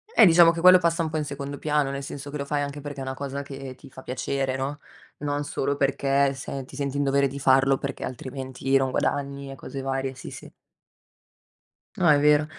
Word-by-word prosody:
Eh 225 - +8
diciamo 170 -1 +7
che 170 - -5
quello 185 +1 +8
passa 170 -1 +1
un 160 - -2
po' 160 - -3
in 155 - 0
secondo 140 -1 -6
piano, 150 -2 +1
nel 140 0 -4
senso 140 0 -7
che 150 - -4
lo 140 - -3
fai 145 +1 -1
anche 145 0 -4
perché 145 -1 -7
è - - -4
una 130 0 -4
cosa 140 +1 -5
che 135 -2 -8
ti 125 - -15
fa 130 - -12
piacere, 130 +1 -2
no, 140 +2 -3 0.4
non 145 0 -2
solo 140 0 -1
perché 140 0 +2
se 135 0 -6
ti 135 - -13
senti 140 0 -2
in 145 - +1
dovere 140 0 +2
di 140 +1 -7
farlo 135 0 +4
perché 140 +1 -5
altrimenti 130 +1 -3
non 135 -1 +1
guadagni 140 +1 -2
e - - -8
cose 135 0 -7
varie, 135 0 -2
sì, 130 - -9
sì. - - -10 1.5
No, 180 - +2
è 150 -2 +6
vero, 150 +1 +4
140 Hz, 225 wpm, -25 LUFS, 135-145 Hz, 1.5 s, Eh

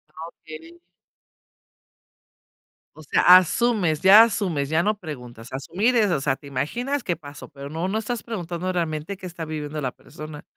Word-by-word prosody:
Ah, 160 +1 -7
okey. 160 +2 -13 2.2
O 155 - -13
sea, 145 - +1 0.2
asumes, 185 -4 +1
ya 200 +4 +9
asumes, 180 -11 -1
ya 160 +3 +1
no 210 0 0
preguntas, 125 - -9
asumir 190 - 0
es, 215 -4 +3
o 170 - +1
sea, 135 -1 0
te 140 0 -15
imaginas 240 - -2
qué 175 - -1
pasó, 145 -3 -11
pero 140 -1 -10
no 165 +4 -3
no 210 +3 -1
estás 235 +1 -4
preguntando 180 -4 -4
realmente 165 +1 -3
qué 185 -1 -9
está 170 -2 -7
viviendo 150 -1 -5
la 130 -3 -2
persona, 150 +3 -11
165 Hz, 165 wpm, -23 LUFS, 150-200 Hz, 2.2 s, ya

